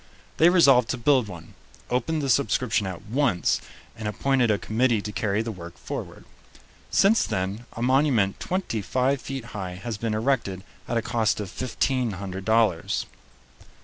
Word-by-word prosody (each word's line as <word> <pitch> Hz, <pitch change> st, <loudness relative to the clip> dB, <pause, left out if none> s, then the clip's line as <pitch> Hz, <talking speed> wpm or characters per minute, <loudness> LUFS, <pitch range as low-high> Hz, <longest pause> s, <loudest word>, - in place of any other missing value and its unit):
They 165 Hz, -, +6 dB
resolved 135 Hz, -10 st, +5 dB
to 130 Hz, -, -1 dB
build 130 Hz, -1 st, +3 dB
one, 85 Hz, -4 st, -10 dB, 0.4 s
opened 145 Hz, +5 st, 0 dB
the 135 Hz, -, -1 dB
subscription 120 Hz, -5 st, +1 dB
at 95 Hz, -2 st, -6 dB
once, 115 Hz, -6 st, +1 dB, 0.3 s
and 110 Hz, -2 st, -5 dB
appointed 125 Hz, +3 st, +1 dB
a 105 Hz, -, +3 dB
committee 115 Hz, +2 st, +1 dB
to 105 Hz, +1 st, -5 dB
carry 105 Hz, +1 st, 0 dB
the 115 Hz, -, -4 dB
work 85 Hz, -4 st, -10 dB
forward. -, -, -7 dB, 0.6 s
Since 215 Hz, +4 st, +4 dB
then 100 Hz, +6 st, -3 dB
a 115 Hz, -, -4 dB
monument 130 Hz, -6 st, +2 dB
twenty 180 Hz, -, -2 dB
five 130 Hz, +5 st, 0 dB
feet 135 Hz, -3 st, -5 dB
high 95 Hz, -3 st, -5 dB
has 110 Hz, +3 st, -5 dB
been 115 Hz, -1 st, -1 dB
erected 110 Hz, -6 st, 0 dB, 0.2 s
at 120 Hz, -, -1 dB
a 115 Hz, -, 0 dB
cost 110 Hz, -3 st, +1 dB
of 100 Hz, -3 st, -5 dB
fifteen 130 Hz, -2 st, -1 dB
hundred 95 Hz, 0 st, -6 dB
dollars. 110 Hz, -7 st, +2 dB
115 Hz, 160 wpm, -25 LUFS, 100-130 Hz, 0.6 s, They